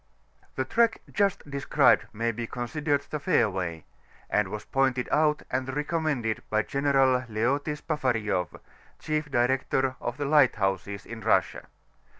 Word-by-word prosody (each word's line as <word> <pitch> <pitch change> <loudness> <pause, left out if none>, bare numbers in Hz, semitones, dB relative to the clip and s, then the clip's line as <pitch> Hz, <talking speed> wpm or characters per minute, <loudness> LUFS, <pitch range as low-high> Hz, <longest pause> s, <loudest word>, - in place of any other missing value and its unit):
The 130 - -1
track 230 - +2
just 200 -6 0
described 140 -1 +3
may 115 +2 -1
be 115 +1 -5
considered 145 +4 -1
the 150 - -2
fairway, 95 - 0 0.5
and 105 -2 +2
was 105 +2 -6
pointed 130 -2 +1
out 150 0 +2
and 130 +1 -1
recommended 150 -7 -1
by 110 0 +1
General 135 -2 +2
Leoty 135 +7 0
Spafarieff, 110 - -1 0.4
Chief 155 -1 -2
Director 130 +1 +1
of 120 +3 -4
the 145 - -2
Lighthouses 100 - +2
in 115 -1 -8
Russia. 110 - +1
130 Hz, 130 wpm, -27 LUFS, 110-145 Hz, 0.5 s, described